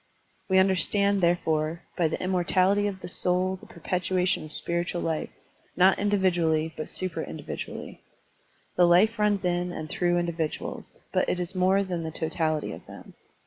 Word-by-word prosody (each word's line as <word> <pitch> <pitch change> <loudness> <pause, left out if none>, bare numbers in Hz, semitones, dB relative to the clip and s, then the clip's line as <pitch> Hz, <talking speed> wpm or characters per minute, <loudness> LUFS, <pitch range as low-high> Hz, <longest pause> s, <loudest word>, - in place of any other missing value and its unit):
We 190 - +4
tmderstand, 195 +2 +3
therefore, 165 -1 0
by 170 - +2
the 155 - -3
immortality 185 +2 +2
of 190 -2 -5
the - - -6
soul 180 +1 +1
the - - -16
perpetuation 180 +2 -1
of 155 - -10
spiritual 170 +2 -2
life, 160 -1 -2 0.5
not 190 +1 +5
individually 175 -6 +1
but 155 - -6
supra 185 -2 -3
individually. 80 +2 -7 0.8
The 175 - +6
life 210 +6 +4
runs 205 -3 +1
in 175 0 0
and 155 -3 -6
through 175 -1 +1
individuals, 170 -2 -4
but - - +1
it 180 - -1
is 180 +1 -4
more 190 +1 +3
than 180 -3 -3
the 160 - -4
totality 160 -1 -2
of - - -10
them. - - -12
180 Hz, 155 wpm, -27 LUFS, 165-190 Hz, 0.8 s, The